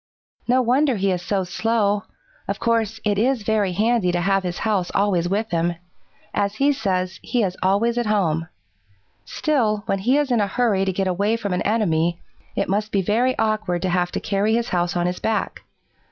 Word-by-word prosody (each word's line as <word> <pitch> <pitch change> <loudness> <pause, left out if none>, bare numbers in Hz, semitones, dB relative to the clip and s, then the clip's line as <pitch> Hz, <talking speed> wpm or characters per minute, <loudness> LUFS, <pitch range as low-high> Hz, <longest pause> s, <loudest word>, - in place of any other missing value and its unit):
"No 255 +1 +3
wonder 260 +3 +2
he 195 -1 +1
is 180 -1 -1
so 195 +1 -1
slow. 205 +2 0 0.4
Of - - -2
course, 225 -1 0
it 205 -1 +1
is 245 0 +1
very 205 -3 +1
handy 215 -1 +2
to 175 - 0
have 195 +1 +2
his 180 -1 -4
house 200 -5 0
always 185 -4 +1
with 210 +2 -1
him. 170 0 0 0.6
As 200 0 0
he 280 +4 +3
says, 185 -7 -2
he 245 -3 0
is 185 -2 -1
always 220 +6 +2
at 240 - -1
home. 165 -6 +1 0.8
Still, 225 -9 0
when 195 - -1
he 250 +8 +2
is 290 -3 0
in 235 -3 +3
a 205 - +1
hurry 200 -2 +1
to 190 - +1
get 190 +1 -1
away 200 +5 +1
from 200 -4 -3
an 180 - -1
enemy, 175 -6 +1 0.4
it - - 0
must 210 +2 -1
be 195 -1 +1
very 240 +7 +1
awkward 215 -5 0
to 185 - 0
have 180 0 0
to - - -1
carry 205 +2 0
his 235 0 -1
house 175 -1 0
on 175 - 0
his 180 0 -2
back. 220 0 -2
205 Hz, 200 wpm, -22 LUFS, 185-225 Hz, 0.8 s, No